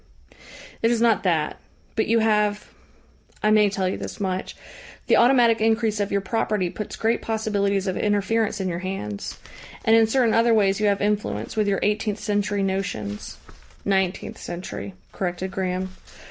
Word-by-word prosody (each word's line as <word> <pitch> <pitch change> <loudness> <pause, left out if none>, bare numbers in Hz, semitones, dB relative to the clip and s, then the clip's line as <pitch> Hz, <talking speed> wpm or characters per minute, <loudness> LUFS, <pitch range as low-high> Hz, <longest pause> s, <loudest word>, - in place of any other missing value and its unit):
"It 230 - +3
is 235 -1 +2
not 230 -2 +3
that. 165 -5 0 0.4
But 220 - +1
you 230 - +3
have 210 -2 +1 0.8
I 215 - +4
may 210 -1 +5
tell 195 -1 -1
you 185 - -2
this - - -7
much 190 -2 -3 0.5
the - - +4
automatic 235 -2 +5
increase 220 -1 +2
of 205 -1 -1
your 200 - +1
property 200 -3 -1
puts 210 - -6
great 225 +1 0
possibilities 205 -3 0
of 190 -2 -1
interference 210 +1 0
in 190 - -1
your 175 -1 -2
hands. 175 - -5 0.5
And 225 - +6
in 225 -1 +5
certain 235 -1 +2
other 230 0 +4
ways 200 -1 +3
you 210 - +2
have 200 -1 +1
influence, 210 0 -1
with 215 -1 +1
your 195 -1 +1
eighteenth 210 0 0
century 205 -1 0
notions." 180 - -3 0.5
"Nineteenth 190 -2 0
century," 170 - -6 0.2
corrected 185 0 -3
Graham. 185 0 -2
205 Hz, 160 wpm, -24 LUFS, 190-220 Hz, 0.8 s, And